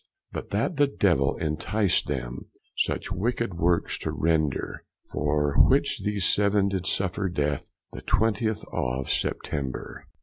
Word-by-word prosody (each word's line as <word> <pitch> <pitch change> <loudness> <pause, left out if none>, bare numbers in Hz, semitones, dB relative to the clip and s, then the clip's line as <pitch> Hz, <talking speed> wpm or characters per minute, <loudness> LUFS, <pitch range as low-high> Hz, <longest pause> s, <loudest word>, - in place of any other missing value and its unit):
But - - -6
that 170 - 0
the 145 -1 +5
Devill 85 - +2
inticed 95 +6 +1
them 65 -3 -4 0.3
Such - - -1
wicked 115 +4 -1
woorks 85 0 +1
to - - -3
render; 80 -3 0 0.3
For 75 -1 +1
which - - +4
these 105 -3 0
seven 100 -1 +3
did 95 -2 -2
suffer 95 +1 0
death, 75 -4 -1 0.2
The - - -8
twentith 110 0 +1
of 65 +2 -1
September. 70 -3 -3
90 Hz, 130 wpm, -26 LUFS, 75-105 Hz, 0.3 s, the